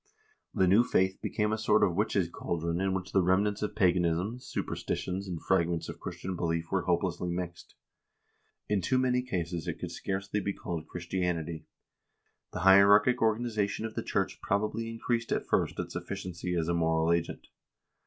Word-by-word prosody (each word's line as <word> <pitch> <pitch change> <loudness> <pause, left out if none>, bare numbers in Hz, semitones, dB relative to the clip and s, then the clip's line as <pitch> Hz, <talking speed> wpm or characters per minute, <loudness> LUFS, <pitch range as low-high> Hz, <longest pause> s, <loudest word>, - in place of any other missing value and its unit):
The 95 - +2
new 100 +6 +5
faith 95 -5 +1
became 105 0 0
a 110 - -1
sort 110 - +3
of 90 - +3
witch's 100 -1 +1
chaldron 85 +1 -2
in 95 0 +1
which 95 -1 -4
remnants 95 +3 +2
of 105 0 -2
paganism, 90 +3 +1
supersti 125 - -3
tions, 95 +2 -4
and 85 -3 -4
fragments 85 -2 0
of - - -7
Christian 95 0 -5
belief 85 -1 -2
were 95 -3 0
hopelessly 90 0 0
mixed. 85 -1 -5 0.9
In 105 -2 +1
too 130 +9 +1
many 125 -1 +2
cases 85 -8 -3
it - - -3
could - - -6
scarcely 100 +1 -3
be 100 -1 -2
called 85 -4 -5
Christianity. 85 -2 -3 0.8
The - - -4
hier 95 +2 +8
archic 120 +5 +5
organization 110 -2 0
of 110 - -5
the - - -2
church - - -2
probably 105 +3 -1
increased 115 0 -2
at - - 0
first - - 0
its - - -5
efficiency 90 0 -4
as 80 -2 0
a 85 - +1
moral 80 0 +2
agent. 85 -1 -2
95 Hz, 170 wpm, -30 LUFS, 85-105 Hz, 0.9 s, hier